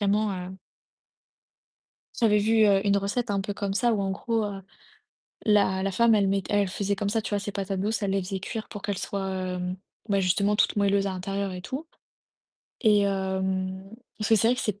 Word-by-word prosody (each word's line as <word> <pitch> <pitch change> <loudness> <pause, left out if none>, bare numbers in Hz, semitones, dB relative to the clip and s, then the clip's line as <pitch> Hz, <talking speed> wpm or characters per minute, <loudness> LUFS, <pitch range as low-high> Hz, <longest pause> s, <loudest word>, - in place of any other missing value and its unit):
Vraiment, 205 +1 +2
heu 180 -1 -5 1.7
J'avais 210 -3 +4
vu, 220 +1 +4
heu, 195 -1 +4
une 200 0 +4
recette 205 +4 -1
un 200 -1 +1
peu 200 +1 -4
comme 200 -2 -3
ça 240 +2 +2
où 210 - 0
en 195 - -1
gros, 225 +3 -1
heu, 200 -2 -5 0.8
la 200 -3 +3
la 195 - 0
femme, 230 +4 +4
elle 200 -2 +3
m'ét 195 -1 +1
elle 205 -1 +2
faisait 200 +2 -1
comme 200 0 -2
ça 220 +1 0
tu - - -5
vois 205 -1 0
ses 205 +1 -5
patates 195 -1 -3
douces, 215 +2 -1
elle 195 - 0
les 195 0 +1
faisait 190 +1 -4
cuire 220 +3 -5
pour 205 -3 -8
qu'elles 205 -2 -2
soient, 195 0 -3
hem, 185 -1 -3 0.3
bah 200 - +3
justement 200 +2 +2
toutes - - +2
moelleuses 200 -1 +2
à - - -2
l'intérieur 195 +1 -3
et 180 - -6
tout 280 - -6 0.9
et 210 -4 +5
hem 190 -1 -1 0.3
parce 215 - -1
que 225 - +6
c'est 225 +3 +3
vrai 250 - +4
que - - -3
c'est 205 -1 -2
200 Hz, 215 wpm, -26 LUFS, 190-210 Hz, 1.7 s, que